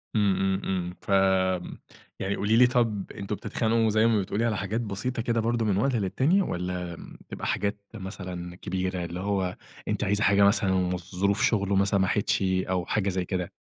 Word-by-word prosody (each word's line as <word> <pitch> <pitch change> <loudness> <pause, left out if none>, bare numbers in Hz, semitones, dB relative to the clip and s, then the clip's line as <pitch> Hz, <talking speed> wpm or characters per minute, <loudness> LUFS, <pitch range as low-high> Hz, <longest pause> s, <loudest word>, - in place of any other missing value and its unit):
إمم، 100 -3 +3
إمم، 95 +1 0
إمم، 90 -2 -2
ف - - -14 1.1
يعني 95 +1 -1
قولي 105 +2 +1
لي، 125 +1 +7
طَب 115 -6 0
أنتم 100 +1 -4
بتتخانقوا 110 +2 0
زي 110 +1 +3
ما 115 -2 +3
بتقولي 100 +4 -1
على 110 -3 0
حاجات 100 +5 -2
بسيطة 115 +3 -3
كده 115 0 0
برضه 115 0 0
من 100 -3 +1
وقت 130 +5 +1
للتاني، 130 - +2
والّا 90 - -3 0.3
بتبقى - - -6
حاجات 100 0 -1 0.2
مثلًا 90 -4 -7
كبيرة، 95 0 -3
اللي 85 +1 -6
هو 95 -2 -1 0.3
أنتِ - - -1
عايزة 105 +2 +1
حاجة 100 -1 +5
مثلًا 100 -1 +3
وظروف 90 +2 0
شُغله 100 -3 +2
مثلًا - - +3 0.2
ما 95 - +3
سمَحتش 105 +2 +1
أو 95 -1 0
حاجة 100 +2 0
زي 95 -1 -1
كده؟ 90 -1 -3
100 Hz, 180 wpm, -27 LUFS, 95-110 Hz, 1.1 s, لي